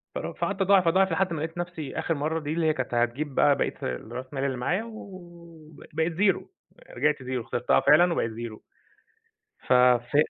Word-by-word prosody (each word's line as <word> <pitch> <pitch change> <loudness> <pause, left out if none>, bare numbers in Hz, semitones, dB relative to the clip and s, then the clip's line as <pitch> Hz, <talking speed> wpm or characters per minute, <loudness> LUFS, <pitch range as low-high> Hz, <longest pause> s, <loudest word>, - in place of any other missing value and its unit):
فرو - - -4
فقعدت 200 0 -3
اضاعف، 190 -2 +4
اضاعف 190 +2 +3
لحد 180 +1 0
ما 160 - -3
لقيت 160 +2 -5
نفسي 175 -5 -5
آخر 165 - 0
مرة 155 +3 -1
دي، 150 -1 -4
اللي 165 0 0
هي 155 - +3
كانت 130 -3 -4
هتجيب 120 +4 -1
بقى 145 -1 +4
بقية - - -1
الراس 115 - -5
مال 135 -1 -2
اللي 130 -2 -1
معايا، 175 - -1
وب 175 -8 -12
بقيت 160 +2 0
0 195 +2 +2 0.5
رجعت 150 +4 +1
0 125 -2 -3
خسرتها 120 0 +2
فعلًا 175 +4 +5
وبقيت 115 -8 -1
0 115 -1 -7 1.1
ف - - +3
ف 125 +1 +4
155 Hz, 185 wpm, -26 LUFS, 125-175 Hz, 1.1 s, فعلًا